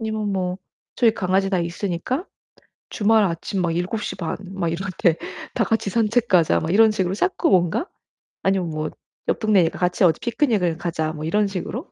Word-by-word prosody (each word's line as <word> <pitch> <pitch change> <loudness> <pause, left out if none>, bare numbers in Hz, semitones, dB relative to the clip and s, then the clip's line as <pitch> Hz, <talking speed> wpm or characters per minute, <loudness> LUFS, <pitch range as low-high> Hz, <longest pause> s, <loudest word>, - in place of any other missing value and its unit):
아니면 220 -2 -2
뭐 185 -1 -2 0.4
저희 230 -3 +4
강아지가 190 0 +1
있으니까 180 - -3 0.6
주말 220 0 +3
아침 180 +1 -2
막 165 -1 0
7:30 180 -1 -3 0.2
막 175 -3 -1
이럴 190 +4 -3
때 165 -2 +3 0.4
"다 - - +2
같이 220 -3 0
산책 230 +2 +1
가자." 175 -5 +4
막 160 - -2
이런 220 +2 +6
식으로 190 -3 -1
자꾸 365 - +1
뭔가 185 - +2 0.6
아니면 190 -3 +1
뭐 155 0 -3 0.4
옆 - - +1
동네니까 195 -7 +2
같이 180 +1 +1
어디 160 -3 +3
"피크닉을 220 - +1
가자." 160 -2 -2
뭐 155 -1 -6
이런 205 +6 +2
식으로 200 - -5
190 Hz, 325 characters per minute, -22 LUFS, 170-220 Hz, 0.6 s, 이런